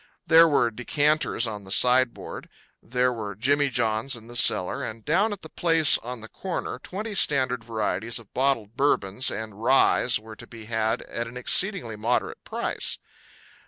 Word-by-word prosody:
There 165 Hz, +1 st, +6 dB
were 125 Hz, -6 st, +1 dB
decanters 145 Hz, +2 st, 0 dB
on 105 Hz, -3 st, -6 dB
the 95 Hz, -, -14 dB
sideboard; 125 Hz, +3 st, +1 dB, 0.3 s
there 125 Hz, +1 st, -1 dB
were 105 Hz, -4 st, -7 dB
jimmy 140 Hz, +6 st, +1 dB
johns 115 Hz, +1 st, -1 dB
in 115 Hz, -2 st, -12 dB
the 120 Hz, +1 st, -13 dB
cellar; 90 Hz, -6 st, +4 dB
and 110 Hz, 0 st, -8 dB
down 190 Hz, +8 st, +1 dB
at 205 Hz, -4 st, -7 dB
the -, -, -8 dB
place 165 Hz, -3 st, +4 dB
on 125 Hz, 0 st, -8 dB
the 110 Hz, -, -9 dB
corner 175 Hz, -4 st, -6 dB
twenty 210 Hz, +9 st, -6 dB
standard 130 Hz, -, +2 dB
varieties 110 Hz, -1 st, -3 dB
of 115 Hz, -4 st, -11 dB
bottled 125 Hz, -5 st, -1 dB
Bourbons 125 Hz, -4 st, +1 dB
and 110 Hz, -1 st, -7 dB
ryes 125 Hz, -1 st, +3 dB
were 110 Hz, 0 st, -13 dB
to -, -, -12 dB
be 115 Hz, -2 st, -12 dB
had 110 Hz, 0 st, -2 dB
at 115 Hz, 0 st, -6 dB
an 120 Hz, +2 st, -10 dB
exceedingly 125 Hz, -, +2 dB
moderate 115 Hz, +4 st, -2 dB
price. -, -, -3 dB
120 Hz, 165 wpm, -24 LUFS, 110-140 Hz, 0.3 s, There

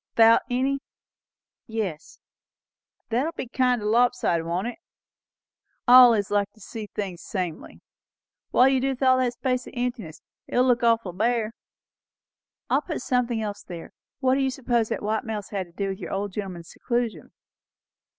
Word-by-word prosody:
"Thout 225 Hz, 0 st, +7 dB
any?" 265 Hz, +3 st, 0 dB, 0.9 s
"Yes." 210 Hz, -9 st, -4 dB, 0.9 s
"That'll 260 Hz, +8 st, 0 dB
be 260 Hz, -, -5 dB
kind 250 Hz, -2 st, +1 dB
o' -, -, -4 dB
lop 240 Hz, +4 st, +3 dB
sided, 170 Hz, -8 st, 0 dB
won't 175 Hz, +4 st, -2 dB
it? 245 Hz, +6 st, -5 dB, 1.1 s
I 250 Hz, +1 st, +10 dB
allays 215 Hz, -5 st, +2 dB
likes 205 Hz, 0 st, +1 dB
to -, -, -21 dB
see 215 Hz, +1 st, -7 dB
things 190 Hz, -5 st, -5 dB
samely. 180 Hz, -5 st, -5 dB, 0.7 s
What'll 265 Hz, +2 st, +5 dB
you 260 Hz, -, +2 dB
do 270 Hz, -, +1 dB
with 265 Hz, 0 st, -3 dB
all 255 Hz, 0 st, +5 dB
that 250 Hz, -1 st, +1 dB
space 250 Hz, 0 st, -2 dB
of -, -, -11 dB
emptiness? 240 Hz, -10 st, -4 dB, 0.2 s
It'll 250 Hz, +1 st, +2 dB
look 250 Hz, -1 st, +3 dB
awful 230 Hz, -6 st, +2 dB
bare." 225 Hz, +2 st, 0 dB, 1.2 s
"I -, -, +3 dB
will -, -, 0 dB
put 320 Hz, -3 st, -5 dB
something 245 Hz, -3 st, 0 dB
else 205 Hz, -1 st, -4 dB
there. 170 Hz, -2 st, -9 dB, 0.3 s
What 260 Hz, -1 st, +3 dB
do 275 Hz, -, +2 dB
you 265 Hz, -, +2 dB
suppose 240 Hz, -3 st, 0 dB
the -, -, 0 dB
white 215 Hz, +1 st, -2 dB
mouse 215 Hz, -3 st, -5 dB
had 195 Hz, -3 st, -3 dB
to -, -, -21 dB
do 195 Hz, +3 st, -3 dB
with 190 Hz, 0 st, -5 dB
your -, -, -6 dB
old 200 Hz, +1 st, -2 dB
gentleman's 180 Hz, -5 st, -6 dB
seclusion?" 235 Hz, -, -3 dB
230 Hz, 170 wpm, -25 LUFS, 200-250 Hz, 1.2 s, I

